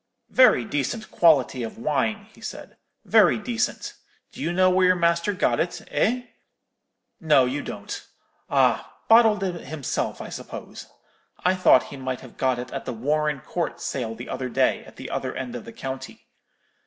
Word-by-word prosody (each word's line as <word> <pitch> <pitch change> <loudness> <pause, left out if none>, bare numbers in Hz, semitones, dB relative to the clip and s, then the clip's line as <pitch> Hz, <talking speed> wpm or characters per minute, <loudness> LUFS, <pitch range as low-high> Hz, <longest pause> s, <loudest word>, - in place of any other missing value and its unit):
"'Very 250 - +5
decent 180 - -3
quality 140 -6 +4
of 115 - -5
wine,' 200 - -1
he 225 - -19
said, - - -8 0.3
'very - - +5
decent. 240 0 -2 0.4
Do - - -10
you 170 - -1
know 185 +1 +4
where 185 0 +4
your 185 - +5
master 170 +2 +2
got 195 - +1
it, 175 - -2
eh? 230 +12 +1 1.0
No, 150 -5 +4
you 135 +3 -2
don't. 100 -6 -7 0.5
Ah! - - +2
bottled 225 -3 +6
it 180 -3 -4
himself, 155 -4 -3
I - - -7
suppose. - - -8 0.6
I 185 - +5
thought 185 -8 +4
he - - -7
might 130 -1 -4
have 130 - -13
got 130 -2 +1
it 125 - -6
at 135 - -5
the 125 - -3
Warren 150 +4 0
Court 175 -2 -3
sale 115 -4 -3
the 120 +2 -8
other 130 -1 -3
day, - - +1
at - - -15
the - - -8
other - - -3
end 125 -2 -5
of 120 - -7
the - - -9
county. 130 +2 -7
150 Hz, 175 wpm, -24 LUFS, 130-185 Hz, 1.0 s, bottled